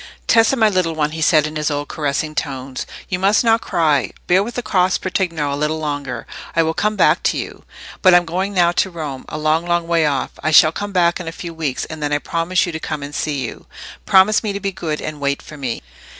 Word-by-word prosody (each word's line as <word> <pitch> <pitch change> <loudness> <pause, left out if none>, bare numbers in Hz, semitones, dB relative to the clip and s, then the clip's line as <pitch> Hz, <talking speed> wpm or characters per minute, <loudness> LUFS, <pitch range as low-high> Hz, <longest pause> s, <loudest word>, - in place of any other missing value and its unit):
"Tessa, 225 +3 +4
my 225 -4 +4
little 185 -5 0
one," 150 -1 0
he 160 +1 -5
said, 155 -2 +4
in 155 0 -4
his 150 0 0
old 145 0 -3
caressing 150 +1 -2
tones, 135 -3 -4 0.2
"you 180 - -2
must 200 +5 +3
not 225 -1 +3
cry. 150 -6 +1 0.2
Bear 180 +2 +4
with 230 +4 -5
the 245 - -3
cross 185 -3 +2
patrigno 170 -6 -1
a - - -1
little 150 +2 -1
longer. 145 -3 -4 0.3
I 165 - +4
will 160 0 0
come 210 +5 0
back - - +3
to - - 0
you. - - -6 0.4
But 185 -2 +6
I'm 175 0 +4
going 185 +4 -2
now 175 -3 +3
to 180 +2 +1
Rome—a 155 -4 -6
long, 155 +2 +1
long 175 -1 +1
way 165 -2 +2
off. 140 -2 -1
I 155 - 0
shall 155 0 +7
come 205 +4 -5
back 175 -2 +2
in 175 - -7
a - - -3
few 170 0 -7
weeks, 155 -5 -3
and 155 -1 -8
then 145 0 -1
I 145 - +3
promise 165 +4 0
you 175 - -4
to 160 - -5
come 155 -2 -4
and 145 +1 -7
see 145 -2 -2
you. - - -9 0.4
Promise 195 +3 +5
me 210 -3 -2
to 200 - -3
be 200 0 -2
good 155 -4 -4
and 155 -1 -5
wait 140 0 0
for 150 - -12
me." 130 - -4
165 Hz, 245 wpm, -19 LUFS, 150-185 Hz, 0.4 s, shall